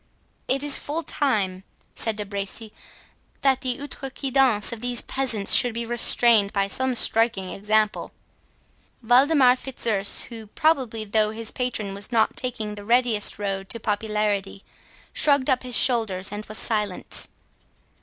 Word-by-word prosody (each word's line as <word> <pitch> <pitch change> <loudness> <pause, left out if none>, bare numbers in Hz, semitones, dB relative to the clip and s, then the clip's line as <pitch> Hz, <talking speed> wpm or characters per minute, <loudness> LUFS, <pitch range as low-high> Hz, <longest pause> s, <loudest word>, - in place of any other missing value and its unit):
"It 270 +2 0
is 290 -1 +4
full 315 +3 -5
time," 205 -12 -2 0.3
said 225 -1 0
De 210 -1 -5
Bracy, 200 +2 -6 0.7
"that 265 -1 +1
the 250 -2 -3
'outrecuidance' 270 -5 0
19 - - -4
of 220 - -15
these 245 -1 0
peasants 240 -7 +2
should 245 -3 +4
be 235 0 -3
restrained 235 -3 +3
by 195 -1 0
some 260 +5 +1
striking 225 -5 +3
example." 215 +1 -1 0.9
Waldemar 255 +2 +4
Fitzurse, 225 -6 -1
who 225 -3 -10
probably 250 -4 -1
thought 215 +1 0
his 225 0 0
patron 235 -6 -4
was 200 +4 -5
not 225 -2 +1
taking 230 -5 -4
the 205 -1 -10
readiest 235 -1 +1
road 195 -1 -4
to 230 - -1
popularity, 210 -2 -3 0.5
shrugged 280 -2 +3
up 255 - +1
his 250 -2 0
shoulders 205 -7 +1
and 210 +1 -7
was 215 - -5
silent. 210 -5 -1
225 Hz, 145 wpm, -23 LUFS, 205-255 Hz, 0.9 s, is